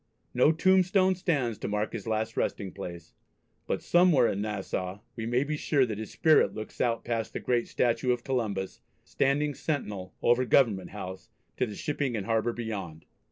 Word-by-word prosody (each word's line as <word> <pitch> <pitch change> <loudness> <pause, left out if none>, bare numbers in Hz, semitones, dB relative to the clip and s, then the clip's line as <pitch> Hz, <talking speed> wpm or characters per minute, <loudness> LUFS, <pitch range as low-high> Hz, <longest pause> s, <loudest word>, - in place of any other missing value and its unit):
No 125 +5 +5
tombstone 185 +2 +4
stands 140 - -1
to - - -4
mark 105 +1 -1
his 115 -3 -6
last 110 0 -1
resting 100 -3 -2
place, 85 -4 -8 0.5
but - - -2
somewhere 175 -8 +5
in 100 - -1
Nassau 100 -2 -3
we 115 -1 -4
may 120 +3 +2
be 150 +2 -2
sure 145 -2 +2
that 110 -3 -4
his 110 - -5
spirit 160 -2 +3
looks 110 0 -6
out 115 -2 0
past 115 -2 -2
the - - -3
great 120 -2 0
statue 125 +1 +1
of 120 -1 -1
Columbus 105 -8 -2 0.2
standing 145 +2 +1
sentinel 105 - -4
over 120 +2 +4
Government 110 -6 +3
House, 95 -2 -8 0.3
to 125 - +1
the 105 - -7
shipping 140 -2 -2
and 100 - -4
harbour 115 +1 +1
beyond. 100 -9 -6
115 Hz, 175 wpm, -28 LUFS, 105-140 Hz, 0.5 s, No